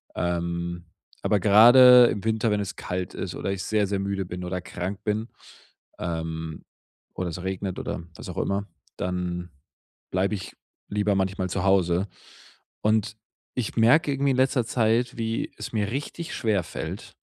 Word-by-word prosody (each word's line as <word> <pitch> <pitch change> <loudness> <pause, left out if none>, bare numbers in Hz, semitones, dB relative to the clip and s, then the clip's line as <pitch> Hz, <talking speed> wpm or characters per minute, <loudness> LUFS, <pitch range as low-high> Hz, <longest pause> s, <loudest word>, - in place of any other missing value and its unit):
Ähm, 85 0 -2 0.4
aber 105 - +2
gerade 120 +5 +8
im 105 - -2
Winter, 110 0 +1
wenn 105 0 +1
es 100 -1 -5
kalt 90 0 -4
ist - - -4
oder 95 - -2
ich 95 -1 -3
sehr 105 -2 +1
sehr 100 0 -1
müde 100 0 -2
bin 90 +1 -6
oder 90 0 -3
krank 90 +3 -5
bin, 110 +2 -1 0.7
ähm, 80 -2 -4 0.5
oder 90 -1 -2
es 90 +2 -6
regnet 95 0 -3
oder - - -4
was - - -9
auch - - -7
immer, 100 +1 -1 0.3
dann 90 -1 -3 0.6
bleibe 95 +3 +1
ich 95 -1 -8 0.3
lieber 105 -1 +1
manchmal 95 -1 -1
zu 90 0 -2
Hause. 95 -1 +3 0.7
Und 110 0 +1 0.4
ich 125 -4 -2
merke 125 +7 +5
irgendwie 140 0 +1
in 130 - 0
letzter 130 -2 +2
Zeit, 115 +1 +1
wie 115 0 -2
es - - -7
mir 105 -1 0
richtig 145 +5 -4
schwer 105 -6 +1
fällt 85 - -7
100 Hz, 160 wpm, -25 LUFS, 90-110 Hz, 0.7 s, gerade